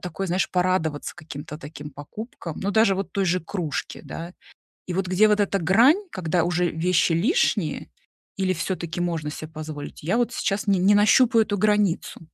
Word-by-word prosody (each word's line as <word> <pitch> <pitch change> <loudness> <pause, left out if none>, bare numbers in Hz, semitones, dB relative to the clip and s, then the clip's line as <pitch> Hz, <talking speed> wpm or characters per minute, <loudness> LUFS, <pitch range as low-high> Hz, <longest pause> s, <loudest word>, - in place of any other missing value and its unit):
такое, 180 +2 -4
знаешь: 180 +2 0
порадоваться 180 -5 0
каким-то 150 -2 -8
таким 150 -1 -9
покупкам, 165 - -8
ну, 200 - -1
даже 220 -3 +4
вот 195 - -4
той 195 - 0
же 180 +2 +2
кружке, 165 -2 -4
да. 170 +2 -7 0.5
И 180 - -4
вот 190 +1 -1
где 195 +4 +4
вот 210 0 +3
эта 200 0 +1
грань, 230 - +5
когда 175 - 0
уже 175 0 +1
вещи 170 +1 +2
лишние, 210 - +1 0.5
или, 185 -1 +1
всё-таки, 170 0 -4
можно 165 -4 -2
се 155 - -7
позволить? 155 -2 -8
Я 175 +8 0
вот 240 0 +1
сейчас 200 -3 -1
не 195 -2 +3
не 195 +3 +4
нащупаю 225 +3 +5
эту 205 -1 -2
границу. 210 -3 +1
180 Hz, 175 wpm, -24 LUFS, 160-205 Hz, 0.5 s, грань